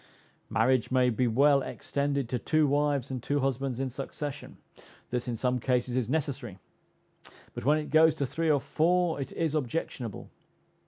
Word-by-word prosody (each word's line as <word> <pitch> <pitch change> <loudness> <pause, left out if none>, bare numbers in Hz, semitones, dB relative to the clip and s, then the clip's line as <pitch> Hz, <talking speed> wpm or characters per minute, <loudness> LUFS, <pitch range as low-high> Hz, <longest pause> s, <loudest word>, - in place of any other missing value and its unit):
Marriage 120 +3 +2
may 130 -1 +3
be 125 +2 +1
well 140 +4 +4
extended 140 -1 -2
to 125 +1 -2
two 155 +5 +2
wives 145 -2 +1
and 130 -2 -4
two 145 +4 0
husbands 135 -1 -1
in 135 - -1
succession; 140 +2 -6 0.5
this, 125 0 -2
in 120 - -2
some 125 +2 0
cases, 125 0 0
is 125 -3 0
necessary; 140 - -2 1.0
but - - -7
when 150 +2 +4
it 155 - -5
goes 160 0 +5
to 140 - -1
three 160 +5 -1
or 145 -2 +4
four 170 +1 +1
it 135 - -5
is 165 -3 -1
objectionable. 130 -5 -3
135 Hz, 165 wpm, -29 LUFS, 125-150 Hz, 1.0 s, goes